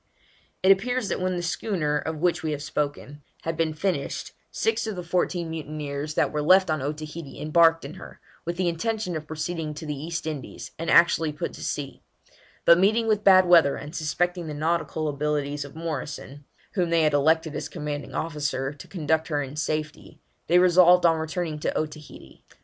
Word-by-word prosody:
It 190 - +7
appears 235 +3 +1
that - - -2
when 185 0 0
the 175 - -3
schooner, 165 -4 -1
of 160 0 -4
which 175 -1 +2
we 155 -1 -2
have 145 0 -5
spoken, 145 -1 -3 0.2
had 165 0 -2
been 160 -1 0
finished, 160 -4 -2 0.2
six 225 0 -1
of 215 - -3
the 180 - -5
fourteen 175 -1 -1
mutineers 150 -1 -5
that - - +2
were 150 - -1
left 185 +2 +5
on 155 -3 -1
Otaheite 150 +1 -6
embarked 165 +1 +4
in 140 - -7
her, - - -12 0.2
with 170 +1 -4
the 185 -1 +1
intention 210 +2 -2
of 155 -1 -5
proceeding 155 0 -4
to 160 - -7
the 150 - -3
East 160 +4 -5
Indies, 150 -4 -6
and 165 - -3
actually 165 -2 +5
put 150 - -5
to - - -9
sea; 140 -2 -4 0.6
but 170 +1 +7
meeting 215 +5 +3
with 215 -2 +1
bad 185 -2 +7
weather, 165 -6 +6
and 150 +3 -8
suspecting 175 +2 -1
the 150 - -5
nautical 160 0 -1
abilities 145 0 -1
of 140 +1 -11
Morrison, 145 -3 -6 0.3
whom 180 -4 0
they 165 -1 +3
had 155 -1 +2
elected 160 +2 +2
as - - -4
commanding 150 -3 -5
officer, 145 -3 -2
to 145 - -12
conduct 160 -3 0
her 145 -3 -1
in 135 +1 -8
safety, 155 0 -4 0.3
they 175 - +5
resolved 180 0 +6
on 165 -1 +4
returning 160 -1 -3
to - - -1
Otaheite. 155 -1 -7
160 Hz, 190 wpm, -25 LUFS, 150-175 Hz, 0.6 s, It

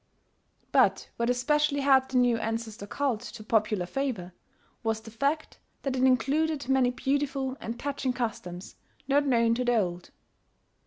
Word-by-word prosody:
But - - +3
what 235 0 0
especially 290 +3 +2
helped 265 -1 +4
the - - +3
new 245 -2 +3
ancestor 225 -2 -4
cult 260 -2 -1
to 215 -1 -9
popular 215 -4 +1
favour, 220 -6 -3 0.5
was 225 -1 -1
the 225 - -11
fact 280 +7 -1 0.2
that 270 -2 -1
it 255 - -1
included 280 +3 +2
many 265 -2 +3
beautiful 270 0 -1
and 230 +1 -5
touching 275 -2 -2
customs 195 -7 -5 0.3
not 285 +1 +3
known 230 -3 +3
to 250 +2 0
the 245 -1 +2
old. 175 -4 -2
250 Hz, 150 wpm, -28 LUFS, 225-275 Hz, 0.5 s, helped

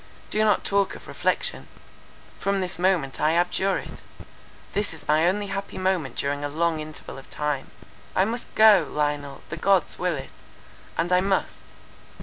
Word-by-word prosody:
Do 215 - +3
not 210 -2 +3
talk 200 -1 +1
of - - -12
reflection; - - -1 0.7
from 200 0 0
this 185 -2 -2
moment 175 -7 +1
I 155 +2 +3
abjure 180 +2 +2
it; - - -8 0.7
this 205 -5 -1
is 145 -2 -12
my 155 +3 +4
only 205 +3 +1
happy 195 0 -5
moment 185 -9 0
during 145 +1 -2
a 145 - -1
long 165 +1 0
interval 155 -3 -7
of 135 - -15
time. 150 -2 -2 0.5
I 190 - +4
must 235 +3 -5
go, 215 -3 +7
Lionel—the 145 0 -3
Gods 195 +1 +2
will 180 -1 0
it; 135 - -7 0.7
and 175 +2 +1
I 180 - +5
must. 195 0 -1
175 Hz, 160 wpm, -25 LUFS, 150-195 Hz, 0.7 s, go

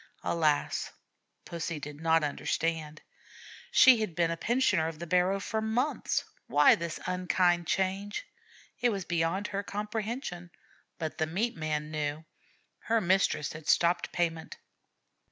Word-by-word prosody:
Alas! 155 -3 0 0.5
Pussy 170 -2 -4
did 145 +1 -8
not 165 -1 +3
understand. 155 +1 -2 0.7
She 250 -4 +7
had 210 -7 -3
been 170 -1 +2
a - - -1
pensioner 235 -5 +1
of 165 -1 -6
the 170 - -6
barrow 180 +3 +2
for 220 +2 -2
months. 240 +7 0 0.2
Why 145 0 +6
this 170 -1 -3
unkind 180 -1 +1
change? 195 - -1 0.5
It 245 - +3
was 195 -5 -3
beyond 170 +3 0
her 200 -1 -2
comprehension. 210 -2 -4 0.5
But 160 -2 -5
the 160 - +1
meat 210 +9 -1
man 155 -1 -3
knew. 150 0 -3 0.5
Her 230 0 +1
mistress 185 -5 +1
had 155 -1 -10
stopped 175 +1 +3
payment. 165 -2 -2
175 Hz, 135 wpm, -30 LUFS, 160-200 Hz, 0.7 s, She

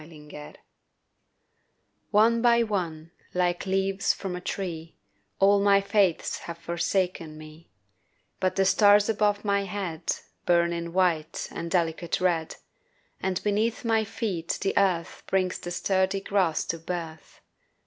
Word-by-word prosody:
LEAVES 150 -2 -12 1.5
ONE 225 +2 +4
by 235 -1 +4
one, 170 -7 -3 0.2
like 180 +1 0
leaves 195 +1 +1
from 190 -2 -5
a 180 - -6
tree, 165 -4 -5 0.4
All 200 +1 +5
my 200 0 +5
faiths 200 -3 +1
have 170 -1 -8
forsaken 170 -1 -2
me; 155 +1 -13 0.7
But 185 - 0
the 195 - +2
stars 205 +1 +5
above 210 -1 +1
my 200 -1 +1
head 180 -4 -5 0.4
Burn 170 0 +3
in 170 0 -4
white 170 -4 0
and 170 0 -5
delicate 170 -1 0
red, 170 -3 0 0.6
And 185 -1 -2
beneath 215 +3 0
my 225 -1 +2
feet 200 -6 -3
the 195 - 0
earth 185 -4 +1
Brings 185 -1 0
the 175 - -6
sturdy 190 +2 0
grass 190 -5 +1
to 165 - -3
birth. 165 -1 -7
185 Hz, 130 wpm, -26 LUFS, 170-200 Hz, 1.5 s, All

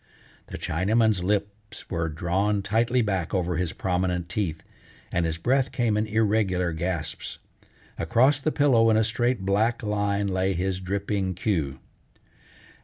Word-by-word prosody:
The - - -7
Chinaman's 105 +3 +1
lips 105 +1 -3
were 85 -2 -2
drawn 95 +6 0
tightly 115 +4 +2
back 95 -4 -1
over 90 -2 0
his 90 -2 -1
prominent 90 -1 -1
teeth, 90 -5 -2 0.5
and 85 -1 +1
his 80 0 -2
breath 130 +9 +1
came 120 -4 +1
in 105 +1 0
irregular 105 -5 +1
gasps. 85 0 -3 0.6
Across 130 - +3
the 155 +2 0
pillow 125 -7 +4
in 110 - +4
a 110 - +4
straight 120 +1 0
black 110 +5 +1
line 100 -1 0
lay 95 0 0
his 95 +1 -1
dripping 95 0 -2
queque. 80 -9 -1
100 Hz, 140 wpm, -26 LUFS, 90-110 Hz, 0.6 s, pillow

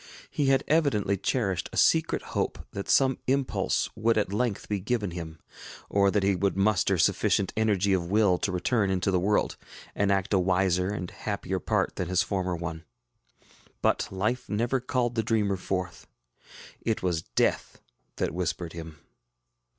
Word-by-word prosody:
He 145 - 0
had 135 0 +3
evidently 140 -11 +2
cherished 95 -3 -1
a - - -7
secret 160 0 +3
hope - - -1
that 100 - -6
some 135 -1 +3
impulse 135 0 +1
would 115 +1 +2
at 105 -2 0
length 110 -1 -1
be 105 -1 -1
given 105 -1 -1
him, 80 -2 -7 0.5
or 100 -1 +4
that 100 0 +1
he 100 0 +3
would 95 +1 0
muster 100 -1 +2
sufficient 95 +4 +2
energy 100 -3 +2
of 85 -2 -1
will 100 -3 +3
to 100 - -1
return 100 +3 +1
into 95 +1 0
the 90 - +2
world, 105 +3 +1 0.4
and 100 -1 +1
act 95 0 0
a 95 - +4
wiser 90 0 +2
and 90 -4 -4
happier 100 -2 -3
part - - -1
than 90 - -2
his 90 0 +2
former 95 -2 -2
one. 85 -1 -5 1.0
But - - +2
life 105 +7 -2
never 120 +5 0
called 125 -1 -1
the 115 - +1
dreamer 105 -3 +1
forth; 90 -1 -4 0.7
it 110 -4 -1
was 85 -3 0
Death - - -1 0.4
that - - -2
whispered 85 -1 -3
him. 80 -2 -8
100 Hz, 165 wpm, -27 LUFS, 90-110 Hz, 1.0 s, or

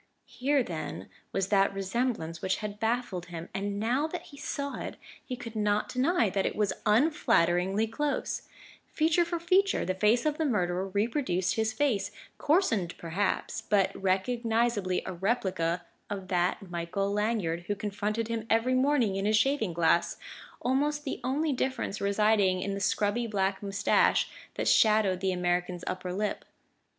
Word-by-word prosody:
Here, 275 +1 +1
then, 155 -7 -6 0.2
was 195 0 -1
that 195 -1 +3
resemblance 195 -4 -2
which 190 - +1
had 210 -1 -6
baffled 225 -6 -1
him; 170 -1 -7
and 200 +1 -2
now 250 +8 +1
that 345 +1 -6
he 305 - -14
saw 280 0 -4
it, - - -5 0.3
he 255 - -5
could 230 -2 -9
not 210 -1 +1
deny 255 0 +2
that 195 0 0
it - - -1
was 210 -2 +1
unflatteringly 205 - +3
close: 285 +6 -2 0.5
feature 320 +2 +2
for 340 0 -3
feature 375 +4 +2
the 185 - 0
face 215 +7 +2
of 305 0 0
the 320 - +1
murderer 185 -7 0
reproduced 200 - 0
his 220 0 0
face, 260 -6 0 0.3
coarsened 230 - +1
perhaps 175 +4 -2
but 200 -2 +2
recognizably 220 0 0
a - - -4
replica 180 -4 -1 0.2
of 195 -2 -5
that 180 +2 0
Michael 180 +4 -2
Lanyard 205 -6 -1
who 205 - 0
confronted 210 +2 -2
him 225 -1 -3
every 230 +3 +3
morning 255 -6 +2
in 195 - -1
his 215 +1 +3
shaving 270 -5 +2
glass, 170 0 +2 0.5
almost 290 +4 +1
the 270 - -4
only 290 +4 0
difference 255 -5 -2
residing 200 -2 +3
in 200 - -2
the 200 - -3
scrubby 205 +4 +1
black 195 -2 0
moustache 200 0 +2 0.2
that - - -2
shadowed 210 -4 +4
the 190 0 0
American's 180 0 -1
upper 185 0 -3
lip. 205 +2 -2
210 Hz, 155 wpm, -29 LUFS, 185-245 Hz, 0.5 s, shadowed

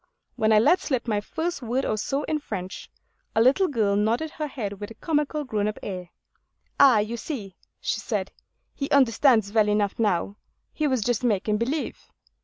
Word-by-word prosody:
When 220 0 +2
I 215 - +6
let 290 +12 +5
slip 255 -5 -2
my 210 -2 0
first 325 +8 -3
word 245 +3 -1
or - - 0
so 275 +7 -2
in 310 - -1
French, 190 -9 -6 0.5
a - - +3
little 270 +11 +4
girl 215 - +1
nodded 230 +10 0
her 305 -1 -4
head 205 -8 -5
with 205 - -6
a 225 - -11
comical 300 -1 -1
grown 215 -6 -1
up 215 - -3
air. 180 -3 -5 0.7
'Ah, 270 -5 +7
you 215 +3 -1
see,' 215 - -6 0.2
she - - -2
said, - - -3 0.4
'he 275 - -4
understands 235 -5 +4
well 215 -2 +4
enough 210 0 0
now; 205 -2 0 0.4
he 305 - 0
was 260 -5 +1
just 245 +1 0
making 210 -2 +1
believe. 265 +8 -3
225 Hz, 185 wpm, -25 LUFS, 210-280 Hz, 0.7 s, Ah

